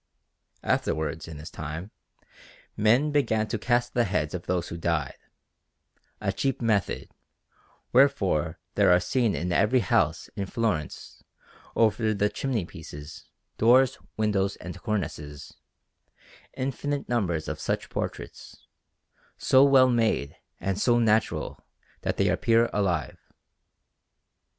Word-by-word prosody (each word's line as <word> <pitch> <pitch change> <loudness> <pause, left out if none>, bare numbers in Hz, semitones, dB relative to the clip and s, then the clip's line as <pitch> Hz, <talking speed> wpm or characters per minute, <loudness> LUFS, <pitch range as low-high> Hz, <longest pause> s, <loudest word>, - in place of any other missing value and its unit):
Afterwards, 80 +1 -1
in 80 -2 -8
his 75 +2 -9
time, 80 +6 -6 0.8
men 120 +8 +3
began 110 -7 +1
to 115 - -2
cast 120 +2 +1
the 120 -1 +2
heads 80 -6 -1
of 90 -1 -6
those 90 -2 -1
who - - -5
died 80 -5 -1 1.1
a 100 -2 -1
cheap 135 +7 -1
method; 110 -4 0 0.8
wherefore 95 - +3 0.2
there 100 -3 +4
are 90 - +6
seen 115 +3 0
in 90 +2 -2
every 105 +8 +3
house 95 - +1
in 100 - -3
Florence, 100 -9 -3 0.5
over 110 -1 +2
the 105 +1 +1
chimney 120 -8 -2
pieces, 75 -2 -10 0.3
doors, 125 +3 +5 0.2
windows, 100 -2 +1
and 90 - -9
cornices, 75 -9 -4 1.0
infinite 140 +2 -3
numbers 90 -10 -1
of - - -4
such - - -2
portraits, - - -6 0.7
so 130 +1 +5
well 135 -2 +6
made 110 -12 +1 0.2
and 95 0 -2
so 120 -1 +4
natural 110 -8 +1 0.4
that - - -2
they - - +2
appear 115 0 +2
alive. 90 -9 -1
105 Hz, 120 wpm, -26 LUFS, 85-120 Hz, 1.1 s, are